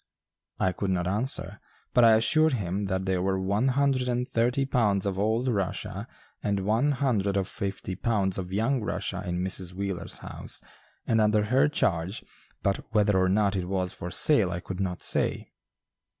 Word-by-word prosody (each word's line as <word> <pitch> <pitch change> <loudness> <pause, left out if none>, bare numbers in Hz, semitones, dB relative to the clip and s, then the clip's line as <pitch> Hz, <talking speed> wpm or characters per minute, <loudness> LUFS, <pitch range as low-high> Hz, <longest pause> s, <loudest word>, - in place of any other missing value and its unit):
I 95 - +2
could 95 +2 -3
not 90 -2 0
answer, 105 +9 -1 0.3
but 125 - +5
I 115 -1 +7
assured 155 +8 +3
him 100 -3 -2
that 95 -1 -2
there 95 -1 0
were 95 0 0
one 100 +6 +1
hundred 135 -1 +1
and 125 +1 -1
thirty 125 +4 +1
pounds 105 -8 +1
of 95 -1 -2
old 110 +5 +1
Rushia 100 -7 -2 0.3
and 100 -1 0
one 115 +8 +2
hundred 110 -8 0
and 95 -1 0
fifty 100 -1 -4
pounds 95 -1 0
of 90 -1 -6
young 115 +6 +1
Rushia 95 -1 -3
in 90 0 -2
Mrs. 95 -1 -1
Wheeler's 95 -1 -3
house, - - -6 0.5
and 110 -1 +2
under 105 0 +3
her 130 +7 +3
charge, 95 - -1 0.4
but 100 0 +1
whether 105 -2 +3
or 95 - +2
not 100 +1 +2
it 90 -2 -1
was 95 -1 -1
for 90 - -6
sale 110 - +3
I 85 0 -3
could 95 +1 -7
not 90 -2 -2
say. - - 0
100 Hz, 180 wpm, -27 LUFS, 95-115 Hz, 0.5 s, I